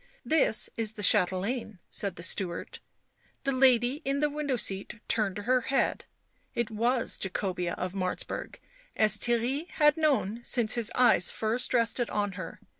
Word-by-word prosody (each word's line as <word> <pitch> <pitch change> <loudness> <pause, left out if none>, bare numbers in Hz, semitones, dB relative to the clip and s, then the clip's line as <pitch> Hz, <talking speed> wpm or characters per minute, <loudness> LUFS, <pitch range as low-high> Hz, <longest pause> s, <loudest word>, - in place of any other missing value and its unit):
"This 310 -8 +2
is 220 -2 -2
the 210 - -6
chatelaine," 200 +3 +3
said 200 -3 -1
the 170 - -9
steward; 175 -1 -2 0.6
the 275 - 0
lady 255 +1 +3
in 275 +1 -1
the 295 0 +1
window 290 -2 -2
seat 200 0 -1
turned 210 -4 0
her 250 +5 +1
head; 270 - 0 0.5
it 235 -2 -1
was 235 +3 0
Jacobea 185 -2 -2
of 185 0 -4
Martzburg, 185 -2 -3 0.4
as 215 -1 +3
Theirry 245 +7 0
had 300 -2 +3
known 250 -8 0
since 235 -4 +2
his 235 -2 -2
eyes 245 -8 +4
first 225 +3 -1
rested 235 0 +1
on 205 -1 -1
her. 185 -3 -8
230 Hz, 150 wpm, -28 LUFS, 195-255 Hz, 0.6 s, eyes